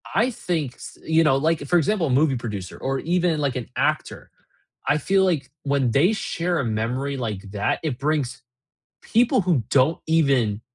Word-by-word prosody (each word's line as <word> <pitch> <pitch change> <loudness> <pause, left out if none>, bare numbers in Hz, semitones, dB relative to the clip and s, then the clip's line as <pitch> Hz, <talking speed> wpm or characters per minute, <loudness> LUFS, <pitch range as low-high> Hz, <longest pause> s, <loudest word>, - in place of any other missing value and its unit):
I 235 +3 +3
think 160 - -3
s - - -11
you 160 0 +3
know, 145 -3 +4
like, 160 +3 +1
for 175 - +3
example, 175 +1 +1
a 130 -1 +2
movie 135 -5 +2
producer 105 -6 -6
or 135 0 -2
even, 175 -2 +1
like, 140 -2 -1
an 125 - -5
actor, - - -2 0.6
I 150 - +3
feel 190 +3 +2
like 150 -8 0
when 140 -3 +1
they 170 - +4
share 175 -5 -2
a - - -1
memory 120 +5 -2
like 110 -6 -4
that, 105 -1 0
it 135 -5 -2
brings 140 -3 -1 0.6
people 240 +1 +2
who 170 -10 +1
don't 140 +4 +3
even 135 -10 +2
140 Hz, 180 wpm, -23 LUFS, 125-170 Hz, 0.6 s, know